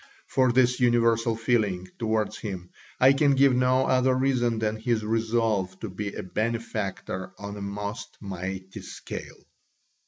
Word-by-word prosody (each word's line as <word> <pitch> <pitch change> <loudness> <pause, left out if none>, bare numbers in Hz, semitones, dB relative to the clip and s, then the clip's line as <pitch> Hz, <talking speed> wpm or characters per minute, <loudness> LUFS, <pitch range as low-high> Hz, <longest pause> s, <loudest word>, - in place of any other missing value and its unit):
For 130 -2 +2
this 125 +1 +3
universal 115 -2 +3
feeling 110 -6 0
towards 110 -2 0
him 95 -4 -6 0.3
I 130 +2 +7
can 140 0 +3
give 135 -1 +5
no 130 +1 +3
other 130 0 +3
reason 125 -3 +1
than 110 0 -1
his 110 -1 0
resolve 110 -4 0
to 110 - -4
be 100 +2 -4
a - - -4
benefactor 105 -3 -3
on 100 0 -6
a 100 - -7
most 100 +2 -5
mighty 95 -1 -6
scale. - - -8
110 Hz, 145 wpm, -26 LUFS, 100-125 Hz, 0.3 s, I